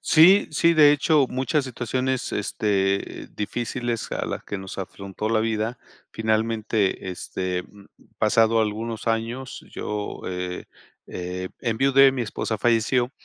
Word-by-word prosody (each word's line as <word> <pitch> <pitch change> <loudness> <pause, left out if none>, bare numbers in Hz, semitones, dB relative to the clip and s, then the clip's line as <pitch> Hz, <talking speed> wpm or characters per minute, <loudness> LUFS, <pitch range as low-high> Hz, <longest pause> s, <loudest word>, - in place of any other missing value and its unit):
Sí, 180 +6 +6
sí, 170 +2 +3
de 150 -2 +7
hecho, 150 -1 +3
muchas 135 +3 0
situaciones, 130 +1 -2
este, 100 -2 -1
difíciles 120 +2 -3
a - - -2
las - - -5
que 100 - -4
nos 95 0 -8
afrontó 100 +2 -5
la 110 -1 +2
vida. 110 +1 -1 0.3
Finalmente, 110 -3 0
este, 90 0 -3
mm, 100 +1 -17 0.3
pasado 115 0 +4
algunos 110 +2 -3
años, 115 +3 -2
yo, 105 -1 -4
eh 90 0 -4 0.5
eh, 90 +1 -4
enviudé, 135 +3 +4
mi 130 - -3
esposa 110 0 -3
falleció. 120 +2 +2
115 Hz, 125 wpm, -24 LUFS, 105-130 Hz, 0.5 s, de